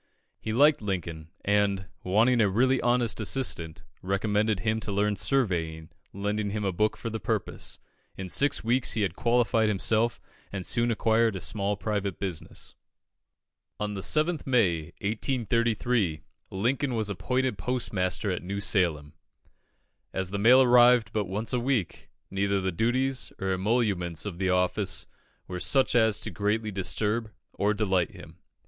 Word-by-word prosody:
He 110 - -4
liked 145 +5 +4
Lincoln, 85 -6 -4 0.2
and, 100 -2 +1 0.2
wanting 115 +6 +3
a 105 - +3
really 130 +6 +2
honest 120 -2 +1
assistant, 95 -9 -2 0.2
recommended 105 +1 0
him 110 +1 0
to 110 - -4
learn 105 +1 +1
surveying, 85 - 0 0.2
lending 105 +1 -2
him 105 0 -3
a 95 - +1
book 105 +4 0
for 115 - -5
the 110 - -3
purpose. 90 - -3 0.4
In 95 - -5
six 140 +10 +2
weeks 120 +1 +2
he 110 -1 0
had 95 -3 -2
qualified 115 -2 +2
himself, 110 +3 +1 0.3
and 95 -3 -5
soon 120 0 +1
acquired 115 -1 +2
a - - -3
small 100 +2 -1
private 100 -3 -2
business. 95 -5 -6 1.1
On 105 0 -2
the 100 - -5
7th 155 - 0
May, 95 -12 +2 0.2
1833, 115 - 0 0.3
Lincoln 125 +6 -1
was 110 -2 0
appointed 130 +6 -1
postmaster 105 -6 -1
at 90 - -3
New 100 +3 -4
Salem. 85 -8 0 1.0
As 95 -1 -3
the 100 - -2
mail 125 +5 +7
arrived 120 -2 +5
but 105 -2 0
once 105 +7 -3
a 125 - +2
week, 120 -7 -2 0.2
neither 100 0 0
the 95 0 -1
duties 125 +8 0
nor 95 0 -1
emoluments 95 -5 0
of 95 -4 -6
the 95 -1 0
office 90 0 0 0.4
were 90 0 -5
such 135 +7 +2
as 110 -3 +3
to - - -3
greatly 105 +1 -1
disturb 105 +3 -1 0.2
or 105 +1 0
delight 95 -5 0
him. - - -13
105 Hz, 150 wpm, -27 LUFS, 95-120 Hz, 1.1 s, mail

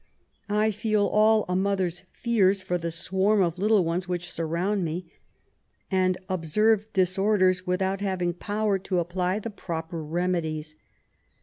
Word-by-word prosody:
I 210 +1 +2
feel 210 0 +1
all 215 +1 +4
a 180 - -1
mother's 185 -2 0
fears 200 -5 +2
for 180 -1 -1
the 170 0 -3
swarm 190 +5 +2
of 170 0 -2
little 205 -2 +3
ones 175 +2 -1
which 175 -1 -3
surround 175 +5 -1
me, 165 +1 -4 0.8
and 185 -1 +2
observe 210 +5 +1
disorders, 185 -1 +2
without 190 +2 0
having 185 -3 -1
power 205 +2 -1
to 185 0 -2
apply 180 +2 0
the 220 +1 -5
proper 165 -4 -5
remedies. 160 -2 -2
185 Hz, 135 wpm, -26 LUFS, 175-205 Hz, 0.8 s, all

